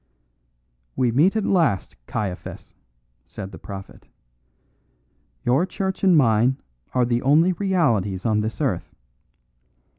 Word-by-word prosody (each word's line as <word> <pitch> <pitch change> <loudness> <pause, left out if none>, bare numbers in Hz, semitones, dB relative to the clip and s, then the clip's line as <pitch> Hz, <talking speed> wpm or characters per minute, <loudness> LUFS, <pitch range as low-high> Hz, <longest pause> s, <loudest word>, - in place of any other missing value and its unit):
"We 125 -2 +1
meet 160 - +3
at 220 - 0
last, 160 - +1
Caiaphas," 100 -4 -5 0.5
said 95 - -8
the - - -11
prophet. 95 -1 -10 1.4
"Your 130 +7 +3
church 190 0 -3
and 185 -4 +5
mine 120 0 +3 0.4
are 125 -1 +3
the 120 0 0
only 155 +7 +4
realities 120 - 0
on 110 -2 +2
this 110 +1 -4
earth. - - -2
125 Hz, 115 wpm, -23 LUFS, 105-170 Hz, 1.4 s, and